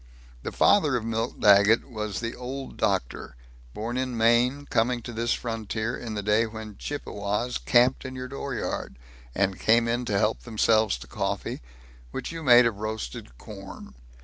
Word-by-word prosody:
The - - -5
father 155 -10 +4
of 115 -2 -2
Milt 115 +1 -2
Daggett 100 +2 +5
was 105 -4 -4
the 115 0 -4
Old 130 +2 -6
Doctor, - - -2 0.4
born 115 +3 -3
in 130 -2 -2
Maine, 120 +5 +3
coming 120 -1 0
to 120 - -7
this 115 +1 -1
frontier 115 0 -2
in 115 -3 -6
the 105 - -3
day 105 +3 +3
when 110 -1 -8
Chippewas 105 -4 -3
camped 125 +1 +3
in 130 0 -7
your 130 0 -5
dooryard, 135 - -4 0.4
and 95 -1 0
came 115 +1 +4
in 120 +1 -1
to 105 -3 0
help 105 +3 +1
themselves 110 - +2
to 65 - -11
coffee, - - -3 0.5
which - - -5
you 165 0 -6
made 125 -4 +7
of 115 -4 0
roasted 105 - -5
corn. - - -10
115 Hz, 165 wpm, -26 LUFS, 105-125 Hz, 0.5 s, made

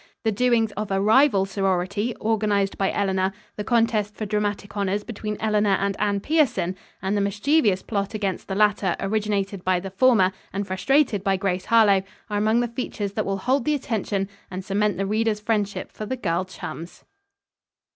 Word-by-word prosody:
The 220 - +2
doings 225 0 +2
of 210 0 -4
a 195 0 +1
rival 215 0 +4
sorority, 195 +3 -1
organized 210 -3 0
by 195 - 0
Eleanor, 190 -1 0 0.2
the 210 - -4
contest 225 -3 +1
for 215 - -4
dramatic 205 0 -2
honors 200 0 -1
between 210 -2 -5
Eleanor 210 -2 +2
and 200 0 0
Anne 205 -1 +1
Pierson 225 - +1 0.3
and 190 +2 0
the 205 - +1
mischievous 205 0 +2
plot 200 -1 -2
against 200 -3 -2
the 195 - -3
latter 205 -3 +2
originated 200 -2 -1
by 185 -1 +2
the 190 +1 -7
former 195 -3 +4 0.2
and 200 +1 -3
frustrated 205 +3 +1
by 195 -2 +2
Grace 185 -1 -1
Harlowe, 210 -4 +5 0.3
are 205 - 0
among 220 +3 +3
the 240 - 0
features 230 -4 -4
that 215 -1 -2
will 195 0 0
hold 255 +6 +1
the 300 +3 +1
attention 205 -6 -2 0.2
and 185 0 -6
cement 205 -1 0
the 195 - -1
reader's 215 +1 0
friendship 210 -2 -2
for 215 - -7
the 260 - -3
girl 180 -5 -1
chums. 175 -2 -8
205 Hz, 175 wpm, -24 LUFS, 195-220 Hz, 0.3 s, Harlowe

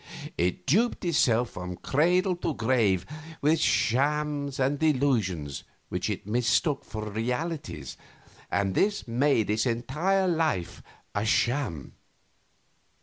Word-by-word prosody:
It 90 +1 -1
duped 215 - +2
itself 120 -8 +2
from 90 0 -6
cradle 180 +6 +2
to 165 -4 -2
grave 110 -7 +2 0.3
with 155 +2 +3
shams 145 +1 +1
and 135 +2 +1
delusions 115 - 0 0.3
which - - -2
it - - -4
mistook 125 - +1
for 110 -1 -6
realities, 115 - -4 0.5
and 100 -1 0
this 200 - +1
made 120 -3 +2
its 110 +4 +1
entire 150 +12 0
life 160 - 0 0.3
a 100 - -1
sham. 115 - 0
130 Hz, 110 wpm, -27 LUFS, 105-150 Hz, 0.5 s, with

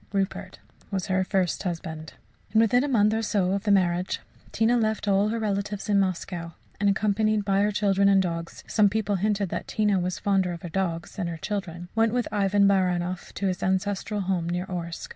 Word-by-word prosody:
(Rupert 195 -1 -2 0.3
was 190 -2 -2
her 190 -1 +1
first 185 -2 0
husband.) 160 -3 -5 0.4
And 220 - +5
within 245 +3 +3
a - - 0
month 215 -5 +3
or 225 - 0
so 200 -4 +1
of 200 +2 -2
the 205 - +3
marriage 180 -2 +2 0.3
Tina 225 +2 +2
left 220 -2 0
all 200 +1 +3
her 230 - -1
relatives 205 -1 -2
in 200 -1 +4
Moscow, 175 -3 -2 0.3
and, 205 0 +3
accompanied 215 +1 +1
by 195 0 +2
her 210 +1 +2
children 200 -1 +3
and 195 -1 +5
dogs 170 -2 -3
some 210 -2 +3
people 205 -1 0
hinted 205 0 0
that - - -4
Tina 210 -3 +1
was 180 0 -2
fonder 190 -3 +1
of 170 - -9
her 175 - -5
dogs 170 -1 -3
than 185 -4 -2
of 170 - -3
her - - -6
children 175 -2 -4
went 225 0 +2
with 245 -1 0
Ivan 200 -1 +3
Baranoff 180 -2 0
to 200 - -3
his 185 -2 -1
ancestral 200 +2 -1
home 180 -3 -1
near 180 +1 -2
Orsk. 170 -3 -5
195 Hz, 205 wpm, -26 LUFS, 180-210 Hz, 0.4 s, And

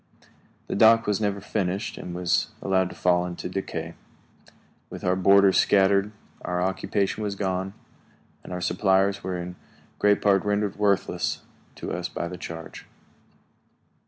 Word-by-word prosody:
The - - -4
dock 115 +2 +6
was 105 0 0
never 100 -1 0
finished 95 -1 -2
and 90 -1 -7
was 90 -1 +1
allowed 95 -2 +1
to - - -11
fall 90 -1 +2
into 90 0 -5
decay. 85 -3 -4 1.0
With - - -9
our 90 0 +2
boarders 100 +1 +5
scattered, 100 +1 +3 0.3
our 90 0 -2
occupation 95 +2 -1
was 105 -1 -2
gone, 95 0 -2 0.7
and - - -10
our 90 0 -4
supplies 95 +2 +2
were 90 -1 -3
in 90 0 -6 0.4
great 105 -1 +4
part 100 -2 +3
rendered 105 -1 0
worthless 100 -2 0 0.3
to - - -6
us - - -3
by 85 - -4
the 90 +1 -7
change. 80 -2 -8
95 Hz, 145 wpm, -25 LUFS, 90-100 Hz, 1.0 s, dock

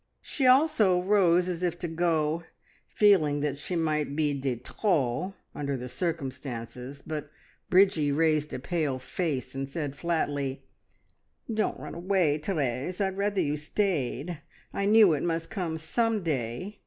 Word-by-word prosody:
She 270 -3 0
also 255 - +5
rose 180 -2 +3
as 175 -1 -3
if 175 -1 0
to 175 - -4
go, 165 -1 0 0.5
feeling 155 -9 +4
that 145 -1 -2
she 180 - -3
might 155 -3 0
be 150 -2 +1
de 135 -2 -1
trop 165 - -1 0.2
under 140 -2 -2
the 125 0 -6
circumstances, 135 -4 -5
but 150 -2 -5 0.4
Bridgie 185 -6 +4
raised 155 0 +2
a - - -3
pale 150 -1 -1
face, 135 0 -3
and 135 0 -4
said 145 -2 -4
flatly 145 -4 -1 0.9
"Don't 215 0 0
run - - -7
away, 170 -4 +1
Therese, 150 - -2
I'd 190 -2 0
rather 200 -1 0
you 150 -3 0
stayed! 155 - -2 0.3
I 200 - -1
knew 210 -4 +6
it 145 - -1
must 165 +1 -2
come 175 -7 -2
some 220 +6 0
day. 150 - -3
160 Hz, 145 wpm, -28 LUFS, 145-185 Hz, 0.9 s, knew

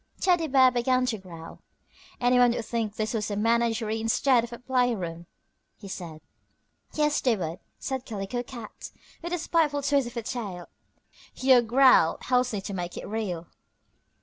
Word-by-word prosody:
Teddy 350 -3 +2
Bear 260 -2 +5
began 255 +1 +1
to 230 -4 -2
growl. 165 -3 -11 0.6
"Anyone 245 -1 +4
would 230 - -4
think 225 -3 -3
this 215 +1 -2
was 215 -2 -2
a 205 - -2
menagerie 225 0 +1
instead 235 +2 +3
of 235 - -7
a 235 - -7
playroom," 230 -10 -1 0.5
he 200 - -11
said. 170 -5 -7 0.7
"Yes, 300 -1 +1
they 245 -3 +2
would," 170 -1 -4 0.2
said 265 -2 -4
Calico 210 +3 -4
Cat, 240 -3 -9 0.3
with 345 0 -6
a 355 - 0
spiteful 310 -4 +1
twist 280 -2 +2
of 240 - -10
her 235 - -3
tail. 200 -7 -5 0.7
"Your 260 -1 +5
growl 245 -7 +5
helps 250 0 +1
me 205 -3 -3
to 200 - -6
make 175 -2 -5
it - - -6
real." 200 -6 -3
235 Hz, 165 wpm, -27 LUFS, 205-255 Hz, 0.7 s, Bear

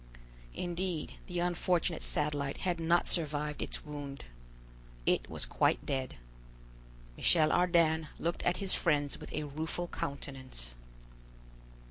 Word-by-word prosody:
Indeed 175 -2 -2
the 180 - -4
unfortunate 175 -1 +1
Satellite 145 -2 -1
had 175 -2 +1
not 170 +1 +3
survived 150 -3 +1
its - - -4
wound. 145 -2 -6 0.8
It - - +2
was - - -1
quite - - +2
dead. 130 - -2 1.0
Michel 155 - +4
Ardan 165 -3 +4
looked 170 +1 -1
at 175 - +2
his 195 -2 +1
friends 145 -4 +1
with - - -9
a 150 - -2
rueful 160 +4 -2
countenance. 130 - -5
155 Hz, 115 wpm, -33 LUFS, 145-175 Hz, 1.0 s, Michel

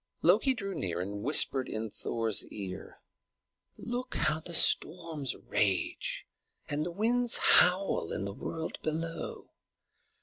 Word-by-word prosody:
Loki 265 -2 +3
drew 195 -5 -5
near 90 - -4
and 100 +3 -5
whispered 135 0 +3
in 110 -1 -5
Thor's 115 -2 0
ear. 95 -2 -9 0.8
"Look, 245 +1 -5
how 155 +2 0
the 170 +1 -5
storms 160 -5 +3
rage 95 -3 -2 0.4
and 150 +1 -2
the 175 - -4
winds 235 +6 +2
howl 180 - +3
in 100 - -3
the 100 - -5
world 160 +9 -6
below! 165 +2 -5
155 Hz, 125 wpm, -30 LUFS, -, 0.8 s, Loki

